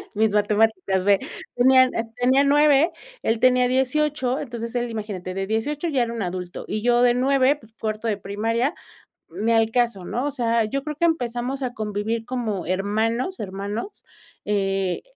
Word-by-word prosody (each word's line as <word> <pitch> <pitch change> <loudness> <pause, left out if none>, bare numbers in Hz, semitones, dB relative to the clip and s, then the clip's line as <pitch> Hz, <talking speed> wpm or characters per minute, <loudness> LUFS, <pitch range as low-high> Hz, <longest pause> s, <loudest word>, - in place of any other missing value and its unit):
Mis 220 0 +2
matemáticas 205 -2 +1
ve 200 0 +4 0.4
tenía 260 +1 +6
n 255 - 0 0.2
tenía 260 +3 +3
9 295 +2 +4 0.3
él 225 0 +1
tenía 250 0 +4
18 265 +1 0
entonces 235 -5 -5
él 240 0 -1
imagínate 205 -5 -5
de 195 +1 -2
18 290 - -1
ya 265 -5 +2
era 235 0 -4
un 230 - -4
adulto 180 -1 -5
y 215 - -3
yo 240 +1 +3
de 245 -1 +5
9 270 +2 +3
pues 225 -5 -20
cuarto 215 +1 -3
de 210 -2 0
primaria 225 - -1 0.6
ni 225 +2 -1
al 225 0 +3
caso, 235 -6 0
¿no? 245 +8 -2
o - - -2
sea, 235 -4 +1
yo 275 +6 -3
creo 300 0 -5
que 340 - +1
empezamos 255 -3 -1
a 250 -1 -3
convivir 215 +1 -3
como 225 -8 -3
hermanos, 220 - -1
hermanos, 205 - -5 0.4
eh, 195 -2 0
230 Hz, 170 wpm, -23 LUFS, 210-260 Hz, 0.6 s, tenía